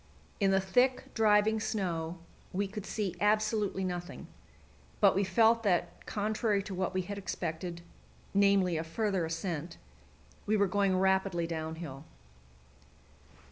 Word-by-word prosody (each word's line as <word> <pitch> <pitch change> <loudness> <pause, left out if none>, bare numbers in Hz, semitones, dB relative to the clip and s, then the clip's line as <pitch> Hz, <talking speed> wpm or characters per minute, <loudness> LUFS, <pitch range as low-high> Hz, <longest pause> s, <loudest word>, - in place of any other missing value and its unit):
In 195 -2 +3
the 195 0 +4
thick, 245 +7 +1
driving 220 0 +3
snow 175 -6 -2 0.4
we 200 +2 0
could 210 0 -7
see 200 -5 -2
absolutely 210 -2 +1
nothing; 180 -1 -5 0.7
but 200 -2 +6
we 195 - +1
felt 230 +3 +4
that, 190 -6 -1
contrary 210 -1 0
to 195 - -6
what 185 0 -2
we 185 - +1
had 200 +2 -5
expected 170 -2 -4 0.5
namely, 200 -3 +3
a 160 - -2
further 190 +1 -1
ascent 165 -1 -4 0.7
we 215 +1 +3
were 200 - +4
going 195 0 +1
rapidly 190 -2 +2
downhill. 160 -3 -5
190 Hz, 130 wpm, -31 LUFS, 175-210 Hz, 0.7 s, but